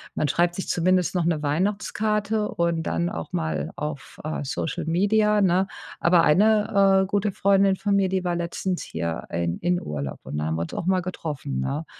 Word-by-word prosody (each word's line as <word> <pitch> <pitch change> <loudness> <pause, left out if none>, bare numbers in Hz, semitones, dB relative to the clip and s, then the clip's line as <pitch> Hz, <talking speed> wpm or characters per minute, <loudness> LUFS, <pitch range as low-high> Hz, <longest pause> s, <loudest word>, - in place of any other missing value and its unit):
man 150 - +1
schreibt 175 +4 +2
sich 190 - -4
zumindest 180 +1 +2
noch 175 -2 +1
'ne 165 -3 +1
Weihnachtskarte 210 +6 0
und 170 -1 0
dann 170 +1 -1
auch - - -6
mal 165 -3 -2
auf, 150 -3 -6
äh, 155 -1 -3
Social-Media, 200 +9 +1
ne? 190 0 +3 0.3
Aber 170 0 +4
eine, 200 +2 +4
äh, - - -1
gute 205 +1 0
Freundin 195 0 +3
von 200 0 0
mir, 195 -1 +3
die 190 -1 -1
war 175 -1 0
letztens 175 +2 -2
hier 80 0 -4
in 85 0 -1
in 175 +1 0
Urlaub 70 -2 -5
und - - -5
da 75 - -1
haben 80 +1 -1
wir 80 - -2
uns 85 - -5
auch - - -3
mal 185 0 +2
getroffen, 150 - -4
ne? 145 - -2
175 Hz, 190 wpm, -24 LUFS, 150-195 Hz, 0.3 s, Aber